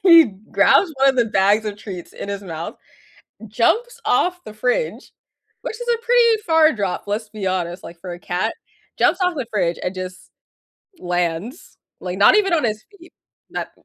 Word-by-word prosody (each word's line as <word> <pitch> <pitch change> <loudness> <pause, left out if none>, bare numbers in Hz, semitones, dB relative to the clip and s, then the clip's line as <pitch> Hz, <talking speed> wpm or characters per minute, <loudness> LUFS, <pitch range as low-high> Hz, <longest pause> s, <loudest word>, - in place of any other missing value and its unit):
he 335 -4 +9 0.3
grabs 370 - +4
one 270 0 +5
of 260 - -6
the 240 -2 +3
bags 205 +2 +2
of 205 -1 -4
treats 185 -5 -8
in - - -7
his 200 0 -4
mouth, 165 -3 -6 0.7
jumps 445 - +1
off 360 0 +1
the 215 - -9
fridge, 250 - -2 0.5
which 445 - -5
is 485 - -6
a 460 - -4
pretty 470 -1 +5
far 320 -1 +5
drop, 200 -4 -2
let's 210 +1 -3
be 210 -3 -5
honest, 180 -1 -2
like, 170 - -10
for 180 -1 -7
a - - -11
cat, 180 +5 -2 0.4
jumps 370 - +3
off 360 -1 +2
the 260 -4 -3
fridge 175 -5 0
and 180 - -2
just 185 0 -8 0.7
lands, 175 - -3 0.2
like, 180 0 -4
not 205 - +6
even 390 -4 +2
on 315 - +2
his 215 -1 -2
feet, 355 -3 -17 0.4
that - - -4
215 Hz, 180 wpm, -21 LUFS, -, 0.7 s, he